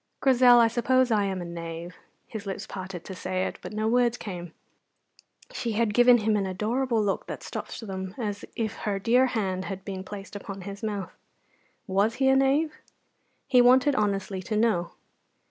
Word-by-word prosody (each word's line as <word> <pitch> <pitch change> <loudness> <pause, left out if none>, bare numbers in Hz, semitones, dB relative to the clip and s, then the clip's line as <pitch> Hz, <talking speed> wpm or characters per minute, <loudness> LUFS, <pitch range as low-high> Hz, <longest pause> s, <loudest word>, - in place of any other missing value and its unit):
"Grizel, 250 -2 +6
I 230 - +6
suppose 250 +2 +2
I 210 -2 +3
am 190 -2 -2
a - - -7
knave." 170 0 -7 0.3
His 215 -3 -7
lips 195 - -4
parted 185 -2 -7
to 190 - -7
say 185 0 -2
it, - - -5
but - - -7
no 215 +1 -1
words 240 0 +2
came. 175 -6 -7 1.0
She 235 - -3
had 220 -1 +1
given 245 +2 +7
him 215 -1 +1
an 200 -2 0
adorable 225 +5 0
look 200 -1 -1
that - - -6
stopped - - -6
them 190 -1 -5
as 205 -4 -4
if 225 -1 -2
her 205 -2 -2
dear 240 +6 +3
hand 190 -6 -2
had 195 -1 -6
been 190 -2 -5
placed 200 +1 -9
upon 195 -1 -7
his 200 +2 -8
mouth. 205 -3 -3 0.7
Was 200 +4 +1
he 265 0 +2
a 265 - +5
knave? 280 +4 +2 0.7
He 250 -2 +5
wanted 260 +4 +5
honestly 200 -3 -1
to 215 +4 -3
know. 210 -7 +1
210 Hz, 180 wpm, -27 LUFS, 190-240 Hz, 1.0 s, given